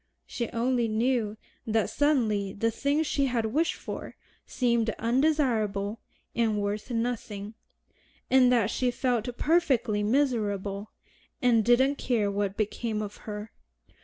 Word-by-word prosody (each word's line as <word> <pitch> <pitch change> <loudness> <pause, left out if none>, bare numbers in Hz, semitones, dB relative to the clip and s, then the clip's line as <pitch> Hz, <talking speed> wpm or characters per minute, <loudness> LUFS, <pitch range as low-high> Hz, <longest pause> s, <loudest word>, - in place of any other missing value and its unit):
She 235 -2 -4
only 240 0 +1
knew 220 -1 0 0.3
that 220 -1 +2
suddenly 220 -10 +1
the 230 +3 0
thing 285 +6 +1
she 280 -2 0
had 240 -3 0
wished 300 +10 +1
for - - -7 0.3
seemed 235 -3 +1
undesirable 230 -6 +1 0.4
and 225 -3 +1
worth 205 +3 -3
nothing, 230 -3 -3 0.7
and 255 -1 +5
that 235 -5 +3
she 255 - +1
felt 245 -1 -1
perfectly 275 -10 +2
miserable, 210 -5 0 0.5
and 235 -3 +3
"didn't 260 +5 +4
care 220 -5 +1
what 200 -1 -2
became 215 +1 -2
of 205 -1 -7
her." 210 +1 -6
230 Hz, 125 wpm, -28 LUFS, 210-255 Hz, 0.7 s, and